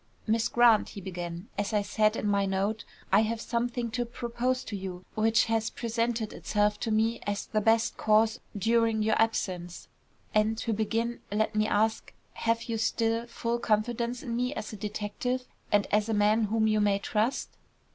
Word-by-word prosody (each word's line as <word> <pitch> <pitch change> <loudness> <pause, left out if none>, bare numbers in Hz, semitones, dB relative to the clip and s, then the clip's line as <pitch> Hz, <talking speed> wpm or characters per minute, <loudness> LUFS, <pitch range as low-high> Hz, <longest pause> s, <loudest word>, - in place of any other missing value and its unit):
"Miss 225 0 +2
Grant," 235 -3 +4
he - - -8
began, 175 0 -6
"as 205 +1 -1
I 210 -1 +2
said 215 +2 +2
in 210 - -2
my 200 -1 +2
note, 195 +3 -1 0.3
I 195 - +6
have 220 +1 0
something 240 0 -2
to 245 +1 -1
propose 240 +2 -2
to 210 - -6
you 185 -2 -6
which 225 +1 +3
has 225 -1 0
presented 230 -1 -2
itself 210 0 0
to 230 - -2
me 220 +2 +1
as 205 0 -2
the 215 -1 -1
best 225 +1 +2
course 220 +2 +3 0.2
during 225 +1 +2
your 220 0 +2
absence; 180 -6 -2 0.4
and, 215 +1 +2
to 225 0 -1
begin, 225 +2 -1
let 215 +1 0
me 215 0 +2
ask, 220 +1 0 0.2
have 230 0 0
you 225 -2 -3
still 230 +1 0
full 235 0 -2
confidence 235 +2 0
in 235 - -3
me 250 +4 -1
as 215 - -5
a - - -4
detective, 215 +5 -3 0.3
and 205 -1 +4
as 210 +1 +2
a 220 - +1
man 210 +2 +3
whom 220 +1 +1
you 215 -1 +2
may 205 -1 +3
trust?" 215 +5 -1
220 Hz, 180 wpm, -29 LUFS, 210-230 Hz, 0.4 s, I